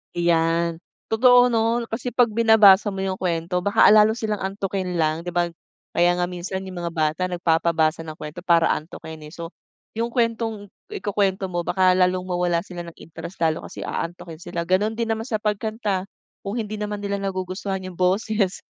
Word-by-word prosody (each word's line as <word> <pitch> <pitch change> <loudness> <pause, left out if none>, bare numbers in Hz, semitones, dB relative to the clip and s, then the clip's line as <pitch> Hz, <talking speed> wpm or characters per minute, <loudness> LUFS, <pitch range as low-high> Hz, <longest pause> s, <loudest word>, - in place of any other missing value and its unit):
Iyan. 170 -1 +1 0.3
Totoo 245 +2 +6
'no, 230 +1 +1
kasi 225 +2 -4
pag 245 -3 +4
binabasa 215 -3 +6
mo 195 -1 -2
yung 190 -1 -3
kuwento 175 0 -1
baka 200 +3 +3
a - - +8
lalo 215 +1 +6
silang 215 -3 -2
antukin 190 -1 -3
lang 160 -1 0
di - - 0
ba? 175 0 0 0.4
Kaya 175 +1 +3
nga 180 - 0
minsan 180 +2 -5
yung 185 -2 -7
mga 170 0 -3
bata 155 +1 0
nagpapabasa 165 -2 +1
ng 155 - -7
kuwento 150 +3 -8
para 170 -2 +3
antukin, 160 0 -6
eh. - - -13
So, 165 0 -8 0.4
yung 230 +1 -2
kuwentong 225 -4 -1 0.2
ikukwento 200 - -1
mo 175 -1 -3
baka 185 0 +3
lalong 180 0 +2
mawalan 175 -1 0
sila 175 -3 -8
ng 170 - -11
interest 165 +3 -10
lalo, 160 -1 +1
kasi - - -8
aantukin 165 -1 -5
sila. 170 0 -4
Gano'n 205 +4 +1
din 230 0 -2
naman 220 0 -2
sa 230 - -1
pagkanta 210 -2 -2 0.4
kung 200 +2 -4
hindi 215 -1 -4
naman 210 0 -3
nila 200 0 -2
nagugustuhan 190 0 -3
yung 185 -1 -8
boses 195 +1 0
185 Hz, 180 wpm, -23 LUFS, 170-210 Hz, 0.4 s, a